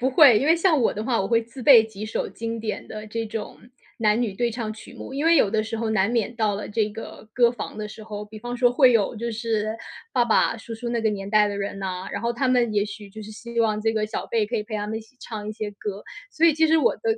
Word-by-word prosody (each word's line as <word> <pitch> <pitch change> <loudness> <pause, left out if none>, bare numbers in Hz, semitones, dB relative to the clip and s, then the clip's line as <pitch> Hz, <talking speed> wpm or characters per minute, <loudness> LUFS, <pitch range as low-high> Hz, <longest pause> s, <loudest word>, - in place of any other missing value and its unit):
不 260 +2 +1
会。 265 -5 +7
因 275 - -1
为 330 +2 +5
像 330 -5 +3
我 225 - +2
的 210 - -4
话， 230 -3 +1
我 195 - -1
会 230 -1 +3
自 235 +3 -11
备 235 -5 +8
几 215 -1 -8
首 - - -2
经 230 0 -5
典 215 -1 -4
的 215 0 -7
这 225 +1 -3
种 215 0 -6 0.4
男 215 +1 +2
女 225 -4 -1
对 240 +3 0
唱 225 -2 -4
曲 215 - -12
目， - - -9
因 290 +3 -2
为 335 0 +6
有 210 - +4
的 215 0 +1
时 225 +1 -4
候 225 0 -2
难 200 0 +2
免 235 0 0
到 215 -3 +1
了 205 - -5
这 210 0 0
个 220 0 -10
歌 240 -1 +5
房 240 - -7
的 215 0 -4
时 215 +1 -10
候， 210 -1 -6
比 215 +1 -11
方 240 +2 -5
说 245 -1 +4
会 255 -1 +6
有 225 0 +2
就 235 +2 -3
是 220 -1 -2 0.4
爸 240 - +3
爸、 230 0 +2
叔 225 0 -8
叔 235 +2 -5
那 235 0 -1
个 220 - +3
年 195 -1 -5
代 210 0 +4
的 200 - -4
人 200 0 -4
呐， 185 -1 -4
然 200 - -3
后 235 0 0
他 255 +2 0
们 245 -3 +2
也 205 -1 +2
许 210 -1 -9
就 215 +2 -9
是 215 - -9
希 235 +2 -4
望 215 -2 +1
这 225 +1 +1
个 215 -1 0
小 215 - -4
辈 220 -3 0
可 235 +2 -2
以 210 - -1
陪 215 0 -8
他 210 0 -3
们 220 +1 -3
一 - - -9
起 225 +3 -20
唱 210 -2 -6
一 - - -3
些 210 -1 -5
歌， 205 0 -6 0.3
所 330 +1 +3
以 320 - +5
其 320 +1 +4
实 320 +1 +4
我 395 - +2
的 - - -30
225 Hz, 320 characters per minute, -24 LUFS, 210-240 Hz, 0.4 s, 备